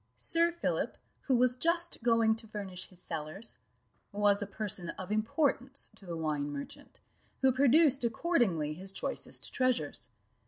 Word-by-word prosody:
Sir 335 +1 +2
Philip, 340 - -2 0.3
who 260 -3 +4
was 250 0 +3
just 335 +4 0
going 230 -1 +4
to 225 0 -9
furnish 195 -4 -5
his 185 - -17
cellars, 165 +6 -5 0.5
was 205 0 +3
a 205 - -2
person 200 -4 -2
of 185 +2 -6
importance 260 +4 0
to 195 - -14
the 170 -1 -4
wine 150 -2 -1
merchant, 140 -1 -8 0.4
who 265 - +6
produced 275 +1 +5
accordingly 225 - +1
his 190 +4 -6
choicest - - -3
treasures. 255 -1 0
220 Hz, 145 wpm, -32 LUFS, 185-260 Hz, 0.5 s, who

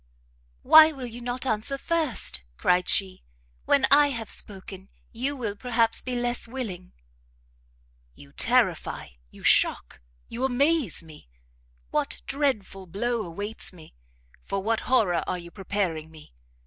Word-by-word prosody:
"Why 315 0 +9
will 270 -4 -7
you 240 0 -8
not 245 +2 -3
answer 225 +3 -1
first?" 290 - -1
cried 180 0 +2
she; 190 -2 +1 0.4
"when 265 - +4
I 290 +1 +7
have 230 -6 -5
spoken, 190 -1 -7 0.2
you 260 +5 -2
will 225 -6 -4
perhaps 230 0 +1
be 255 -1 -4
less 240 -1 -1
willing." 220 -8 -6 1.2
"You 70 - -16
terrify, - - +1 0.2
you - - -16
shock, - - +3 0.3
you 240 +3 -5
amaze 265 - +1
me! 155 - -15 0.6
What - - -2
dreadful 220 -10 -2
blow 235 +6 -1
awaits 205 +5 -3
me? 160 -3 -15 0.5
For 195 -1 -3
what 225 +1 +1
horror 200 -9 +3
are 180 - -1
you 170 -1 -10
preparing 185 -5 -3
me? 155 - -15
225 Hz, 135 wpm, -26 LUFS, 185-255 Hz, 1.2 s, Why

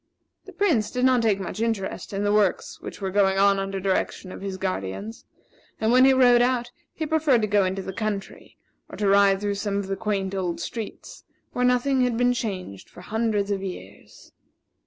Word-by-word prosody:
The 395 - -11
Prince 345 - +1
did 250 0 0
not 255 -2 +4
take 215 -3 +2
much 195 +3 -5
interest 225 -4 -2
in 200 0 -2
the 205 0 +1
works 205 -3 0
which - - -8
were 190 -1 -2
going 195 -1 +2
on 200 0 +4
under 195 0 -3
direction 190 0 -2
of - - -9
his 195 -1 -5
guardians; 190 - -4 0.5
and 220 +1 +1
when 255 +1 +6
he 270 - +6
rode 250 -2 +5
out, 245 -1 0 0.2
he 315 - -4
preferred 300 -7 +2
to - - +1
go 205 -1 +3
into 190 +1 -2
the 190 - -6
country 210 -1 -5 0.3
or - - -9
to 205 - 0
ride 200 0 +4
through 205 -1 -1
some 200 0 -2
of 200 - -2
the 195 0 -3
quaint 195 -2 -2
old 180 -3 -2
streets, 225 -3 -7 0.3
where 250 - +1
nothing 250 +2 +2
had 245 -2 +1
been 245 +1 +3
changed 190 - -5
for 180 - -13
hundreds 210 0 -1
of 195 -1 -1
years. 180 - -10
205 Hz, 200 wpm, -24 LUFS, 195-240 Hz, 0.5 s, when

